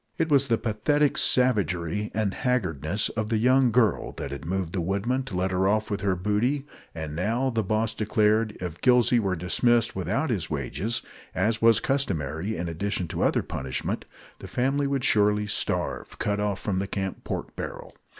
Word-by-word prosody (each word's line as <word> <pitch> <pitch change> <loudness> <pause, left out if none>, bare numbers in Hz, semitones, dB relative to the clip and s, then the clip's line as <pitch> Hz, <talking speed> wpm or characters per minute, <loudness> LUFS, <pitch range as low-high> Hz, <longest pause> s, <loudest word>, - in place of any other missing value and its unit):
It 165 - 0
was 140 -1 +4
the 115 -3 +2
pathetic 140 +8 +1
savagery 105 -6 +2
and 105 -3 0
haggardness 100 - -1
of 110 -1 -3
the 115 - +1
young 130 +3 +4
girl 115 -2 +2
that 70 - -6
had 70 +2 -6
moved 90 -1 -2
the 95 - -1
woodmen 100 +9 0
to 105 - -6
let 95 +1 0
her 95 +1 +2
off 110 +2 +1
with 100 -1 -2
her 95 -1 +1
booty; 105 +10 0 0.3
and 80 -2 -5
now, 115 +9 0
the 115 -2 0
boss 110 +1 0
declared, 110 0 +1
if 85 -2 -6
Gillsey 125 -1 +5
were 95 -4 0
dismissed 115 +7 +2
without 120 - -1
his 95 -8 -2
wages 80 - -2 0.3
as 110 0 +1
was 115 -1 +6
customary, 95 - -1
in 85 +1 -3
addition 90 +2 -2
to - - -3
other - - +2
punishment 65 -1 -4 0.3
the - - -8
family 135 +3 0
would 140 -2 -1
surely 105 -2 +3
starve, 105 - -2
cut 105 0 -1
off 105 -1 -1
from 95 -3 -1
the 100 - -2
camp 95 -1 -4
pork - - -5
barrel. - - -7
105 Hz, 180 wpm, -26 LUFS, 95-120 Hz, 0.3 s, was